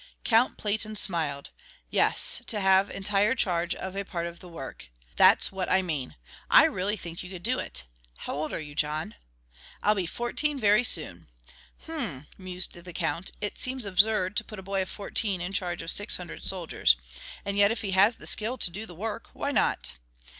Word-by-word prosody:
Count 230 +2 +3
Platen 215 +1 -1
smiled. 155 -8 -1 0.4
"Yes, - - +3
to 215 - -1
have 190 0 +4
entire 205 +3 +1
charge 175 -5 0
of 190 0 -6
a 200 - -2
part 170 -3 -4
of 170 0 -7
the 180 - -12
work. 135 - -9 0.3
That's - - +5
what 190 -2 -3
I 190 0 +3
mean. 150 -7 -4 0.3
I - - +8
really 200 +3 -1
think 170 -2 -8
you 180 - -9
could 185 -2 -9
do 250 +4 +1
it. 65 0 -3 0.3
How - - -6
old 155 +2 -3
are - - -3
you, 150 -2 -8
John?" 150 -4 -1 0.7
"I'll 210 - +4
be 190 -4 -2
fourteen 275 - -2
very 210 0 +4
soon." 90 - +1 0.6
"Hm," 225 - -5
mused 185 -1 -2
the 175 0 -11
Count, 170 +2 -2
"It 205 - -4
seems 255 -2 0
absurd 200 0 +2
to - - +1
put 215 - -10
a 190 - -8
boy 195 0 -1
of 185 - -4
fourteen 200 -1 -1
in 180 +3 -4
charge 175 -4 -2
of 165 - -2
six 205 - +4
hundred 180 -2 -7
soldiers. 170 - +2 0.5
And 200 - -2
yet 200 0 +5
if 225 - -3
he 200 - -3
has 200 +5 +5
the - - -13
skill 230 +4 +4
to 180 - +3
do 210 +5 -6
the 175 - -11
work, 220 +5 -5
why 285 - -3
not? 60 - +1
190 Hz, 195 wpm, -27 LUFS, 170-210 Hz, 0.7 s, I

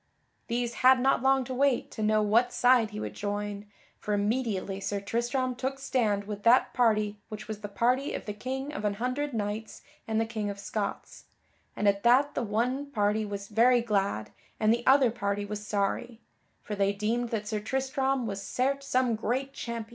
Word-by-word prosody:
These 240 0 -1
had 260 0 +7
not 265 -1 +2
long 265 0 +3
to 260 +1 -5
wait 270 -1 +1
to - - -6
know 215 0 +3
what 230 +4 +3
side 245 -3 +4
he 210 0 -7
would - - -5
join, 205 0 -4 0.3
for 210 - -1
immediately 205 -3 -1
Sir 200 0 -2
Tristram 240 +5 -1
took 265 +2 -3
stand 230 -7 0
with 205 0 -6
that 235 +4 +4
party 215 -3 +2
which 215 -1 -7
was 215 -1 -6
the 205 - -4
party 250 +6 0
of - - -6
the 210 - -4
King 265 +6 -4
of 255 - -5
an 205 -1 0
Hundred 255 +6 -2
Knights 215 -1 -4 0.2
and 220 0 0
the 225 - +1
King 220 -2 -3
of 200 - -5
Scots, 200 0 -5 0.5
and 210 - 0
at 200 0 +3
that 255 +5 +4
the - - -1
one 245 +6 -1
party 210 -3 +1
was 200 -1 -5
very 240 +3 +4
glad, 200 - -1 0.3
and 215 +1 +4
the 235 +1 -2
other 265 -3 +6
party 205 -2 -2
was 210 0 -6
sorry; 220 +3 -1 0.4
for 210 - -5
they 200 0 +1
deemed 230 +4 -1
that 215 -2 -3
Sir 215 0 -1
Tristram 265 +2 -1
was 200 -2 -4
certes 275 +6 -1
some 255 -3 +2
great 255 +5 -2
champion. 235 -4 -5
225 Hz, 195 wpm, -28 LUFS, 205-255 Hz, 0.5 s, had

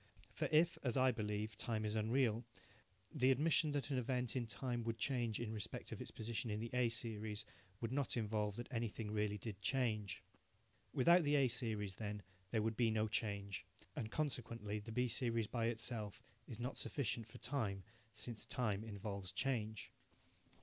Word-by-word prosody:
For - - 0
if, 165 +2 +5
as 125 -1 +1
I 130 0 +6
believe, 105 -1 -2
time 110 -3 0
is 105 - 0
unreal, 115 +1 +3 0.7
the 130 -3 +4
admission 155 +3 +4
that 145 0 -1
an 130 - +3
event 125 -1 0
in 120 -3 0
time 120 +1 -2
would 115 0 -1
change 120 -2 +1
in 115 -2 -2
respect 105 -2 -5
of - - -4
its - - -4
position 115 +2 -3
in 105 0 0
the 115 +1 -3
A 125 -1 +4
series 110 -2 -2 0.4
would 115 -1 -1
not 135 -2 +1
involve 105 -2 0
that 120 +2 -4
anything 115 -3 -2
really 105 -1 +1
did 105 -1 -6
change. 110 -7 +1 0.7
Without 170 +6 +7
the 150 -2 +3
A 135 -2 +6
series 110 -5 -1
then, 105 -2 -3 0.3
there 110 -2 +2
would 110 0 +1
be 115 0 +4
no 110 0 +2
change, 100 -3 -1 0.3
and 110 - -2
consequently 115 -7 -1
the 105 +2 -7
B 125 +2 +2
series 115 -1 +1
by 115 +1 0
itself 115 -3 -2 0.2
is 115 - -7
not 125 +2 -2
sufficient 115 -4 -1
for 115 +2 -11
time, 115 -7 -1 0.3
since 110 +1 -4
time 110 -4 0
involves 100 -3 -4
change. 110 -2 -1
115 Hz, 175 wpm, -40 LUFS, 105-125 Hz, 0.7 s, Without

